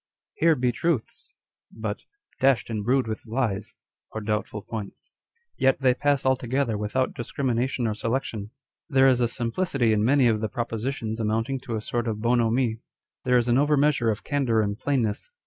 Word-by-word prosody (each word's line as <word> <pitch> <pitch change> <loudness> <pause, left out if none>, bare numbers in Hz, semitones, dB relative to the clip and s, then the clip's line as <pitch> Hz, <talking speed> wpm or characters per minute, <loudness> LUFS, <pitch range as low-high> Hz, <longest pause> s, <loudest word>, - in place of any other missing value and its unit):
* - - -68
" - - -67
Here 165 0 +5
be 125 -2 +1
truths/' 155 -1 -2 0.4
but 110 -1 -4 0.2
" - - -36
dashed 130 -3 +3
and 105 -2 -2
brewed 130 +4 +2
with 110 +1 -5
lies 110 -4 -2 0.2
" - - -57
or 110 - -4
doubtful 105 -1 -3
points. 110 -3 -7 0.5
Yet 135 0 +3
they 130 -2 +4
pass 140 +1 +1
altogether 130 -2 +1
without 105 +5 -1
discrimination 125 0 -1
or 110 - 0
selection. 115 -2 -3 0.4
There 135 -2 +5
\s 130 -2 +4
a 120 - +3
simplicity 120 0 0
in 105 -1 +2
many 130 +2 +4
of 110 -2 +1
the 110 - -1
propositions 115 -1 -3
amounting 115 +4 0
to 120 -3 -3
a 110 - -4
sort 120 +1 -2
of 110 -2 -2
bonhomie. 115 0 +1 0.5
There 125 -1 +4
is 120 0 +1
an 120 +2 +4
over 145 +1 +3
measure 140 -5 +3
of 110 +1 -2
candour 130 -6 +1
and 100 -1 -1
plainness. 120 - -1
120 Hz, 185 wpm, -25 LUFS, 110-135 Hz, 0.5 s, Here